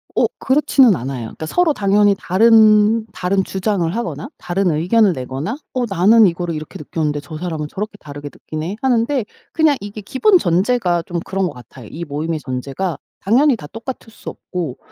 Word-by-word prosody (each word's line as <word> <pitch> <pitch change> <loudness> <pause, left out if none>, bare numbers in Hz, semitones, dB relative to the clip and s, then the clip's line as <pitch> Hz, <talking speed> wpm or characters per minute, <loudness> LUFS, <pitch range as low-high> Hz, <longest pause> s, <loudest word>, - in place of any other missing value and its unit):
어 - - +3
그렇지는 265 -5 +4
않아요. 130 -2 -5
그러니까 160 - -8
서로 335 - +2
당연히 205 -1 +3
다른, 215 +2 +4
다른 190 +2 0
주장을 190 -3 -1
하거나 235 0 -4
다른 180 0 0
의견을 185 +6 +3
내거나 135 - -4 0.2
'어 250 -2 0
나는 210 +4 +5
이거를 170 -1 -2
이렇게 155 0 -7
느꼈는데 150 0 -2
저 155 +2 -9
사람은 160 -3 -4
저렇게 205 +3 -5
다르게 145 0 -8
느끼네.' 160 +6 -6
하는데 250 -1 +1 0.3
그냥 315 -3 +3
이게 205 +1 -7
기본 360 - +3
전제가 180 - +1
좀 175 +1 -4
그런 195 0 -1
것 170 - -3
같아요. 125 -1 -13
이 170 - -6
모임의 155 +2 -3
전제가 140 +6 -4 0.2
당연히 260 +7 +3
다 170 -10 -10
똑같을 225 - -8
수 - - -9
없고 170 -8 -5
190 Hz, 390 characters per minute, -18 LUFS, 155-225 Hz, 0.3 s, 나는